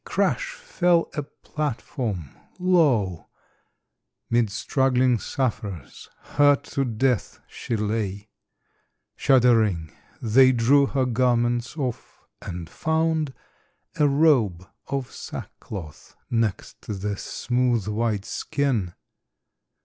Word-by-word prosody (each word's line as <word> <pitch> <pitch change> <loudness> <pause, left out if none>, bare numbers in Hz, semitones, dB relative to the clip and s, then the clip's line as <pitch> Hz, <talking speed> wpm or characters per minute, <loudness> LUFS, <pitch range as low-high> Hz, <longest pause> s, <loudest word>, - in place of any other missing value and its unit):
crash - - 0
fell 180 - +1
a 150 - -2
platform! 125 - -4 0.3
Lo, 145 - +2 1.0
Mid 120 -2 +3
struggling 125 +2 +2
sufferers, 100 - -4
hurt 145 -1 +3
to 140 - -2
death, 125 -2 0
she 115 - -4
lay! 105 -1 -2 0.9
Shuddering, 115 - +3 0.3
they 130 +3 +5
drew 135 +4 +4
her 135 -1 0
garments 120 +1 +1
off 130 -5 -5 0.2
and 85 -2 -6
found 160 - 0 0.7
A 150 - +5
robe 130 - +3 0.2
of 135 -2 -3
sackcloth 85 -8 -9 0.2
next 115 -4 -1
the 100 0 -3
smooth, 120 0 -1
white 105 -1 -1
skin. 120 -11 -1
120 Hz, 90 wpm, -24 LUFS, 105-140 Hz, 1.0 s, they